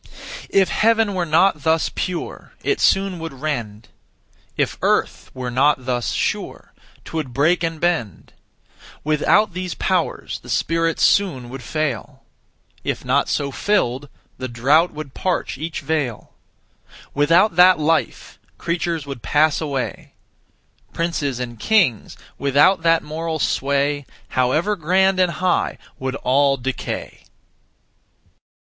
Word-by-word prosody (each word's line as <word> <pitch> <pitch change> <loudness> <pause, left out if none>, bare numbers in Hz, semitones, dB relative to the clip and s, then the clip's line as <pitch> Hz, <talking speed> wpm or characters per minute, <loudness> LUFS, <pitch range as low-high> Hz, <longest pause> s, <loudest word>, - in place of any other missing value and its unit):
If 195 -1 +3
heaven 225 -1 +2
were 180 -2 -1
not 160 0 +3
thus 160 +2 +1
pure, 180 -2 -5
it 415 - 0
soon 195 -2 +2
would 165 -2 -6
rend; 120 -7 -5 0.7
If - - 0
earth - - 0
were 125 -1 -4
not 130 +1 +2
thus 125 -2 -1
sure, - - -3 0.3
'twould 155 -6 -4
break 155 +7 +2
and 165 -1 -2
bend; 155 - -2 0.7
Without 165 +7 +2
these 180 -1 -4
powers, 185 -3 -1
the - - -14
spirits 165 0 0
soon 145 -12 +2
would 135 +1 -8
fail; 150 -5 -3 0.6
If - - -3
not - - +1
so 140 -1 -1
filled, 140 -7 0 0.3
the 130 - -3
drought 140 +8 +3
would 150 -3 -8
parch 180 -7 -2
each 160 +1 -4
vale; 140 -6 -3 0.8
Without 165 +7 +3
that 180 +1 +7
life, 155 +1 -1 0.2
creatures 170 -2 -2
would 140 -4 -7
pass 150 +5 +2
away; 140 -5 -4 0.8
Princes 150 -6 -2
and 120 -2 -6
kings, 180 - +1 0.2
without 145 +7 +4
that 165 0 +3
moral 160 +1 -4
sway, 140 0 0 0.2
However 155 +11 +1
grand 190 +2 +2
and 180 -2 +2
high, 180 +2 0 0.2
would 130 0 -3
all 140 +1 +2
decay. 130 +1 -5
155 Hz, 125 wpm, -21 LUFS, 135-175 Hz, 0.8 s, that